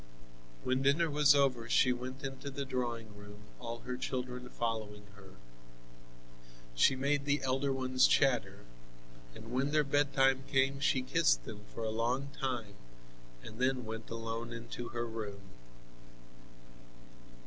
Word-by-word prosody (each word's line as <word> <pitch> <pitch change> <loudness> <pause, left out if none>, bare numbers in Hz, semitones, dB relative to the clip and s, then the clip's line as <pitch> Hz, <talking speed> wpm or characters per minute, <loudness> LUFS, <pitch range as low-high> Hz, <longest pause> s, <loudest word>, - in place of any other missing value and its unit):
When 130 +1 +1
dinner 150 +4 +3
was 145 -1 +6
over 130 -5 +2
she 125 +1 +4
went 130 +2 -7
into 135 +1 -5
the 140 0 -4
drawing 120 -4 -3
room, 105 0 -12 0.2
all 115 -1 -6
her 125 - -4
children 125 -1 -4
following 110 -4 -3
her. 95 -1 -15 1.4
She - - +4
made 140 +2 0
the 145 -1 +1
elder 135 +1 +1
ones 130 -1 +3
chatter, 115 -8 +2 0.7
and 115 +1 -10
when 130 +3 +1
their 150 0 +3
bedtime 135 -2 +3
came 135 0 +2
she 135 -2 +2
kissed - - +3
them 105 -1 -9
for 115 - -6
a 110 - -1
long 120 +5 -1
time 125 -7 -3 0.7
and 110 +1 -10
then 130 -1 +1
went 110 0 -6
alone 115 +1 -4
into 115 +1 -6
her 120 0 -3
room. 105 -3 -6
125 Hz, 135 wpm, -33 LUFS, 115-135 Hz, 1.4 s, was